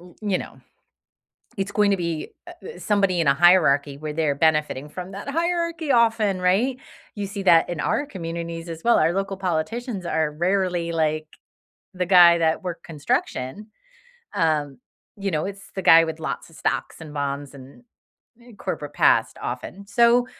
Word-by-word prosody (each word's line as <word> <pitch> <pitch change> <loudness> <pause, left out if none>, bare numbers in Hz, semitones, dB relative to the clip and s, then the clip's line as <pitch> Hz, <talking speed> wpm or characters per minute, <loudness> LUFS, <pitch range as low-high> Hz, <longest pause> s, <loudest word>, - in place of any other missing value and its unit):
u 175 0 -16
you 200 -3 0
know, - - -10 1.0
it's 195 0 -2
going 210 -1 +3
to 200 - +2
be, 170 -3 -3 0.2
uh, 350 +6 -11
somebody 195 -4 +1
in 165 - 0
a 140 - +5
hierarchy 145 -4 +4
where 155 0 -5
they're 155 -2 +1
benefiting 150 -2 +1
from 180 +5 -8
that 200 - -8
hierarchy 335 0 -1
often, 225 -5 +2
right? 210 +9 +1 0.4
You 205 -1 -4
see 200 0 -6
that 170 -3 +5
in 175 - -4
our 290 - 0
communities 170 -4 -6
as 165 -1 -7
well. 235 - +4
Our 165 +2 +3
local 195 0 -2
politicians 185 +4 -3
are 160 -2 0
rarely 175 0 0
like 155 -1 0 0.7
the 180 -1 -2
guy 175 -2 +7
that 160 +1 +1
worked 175 -2 -6
construction, 150 - -3 0.7
um, 150 -4 0 0.4
you 195 -1 -2
know, 155 +1 -1
it's 200 0 -9
the 190 - -4
guy 165 -1 +7
with 160 0 -6
lots - - -5
of 165 - -19
stocks - - -3
and 155 -2 -10
bonds 140 -1 -4
and 135 - -14 0.6
n 240 - -18
n 220 - -15
corporate 145 -5 -5
past 110 - +3
often. 180 +11 -8
So, 235 +4 +4
175 Hz, 170 wpm, -23 LUFS, 155-200 Hz, 1.0 s, guy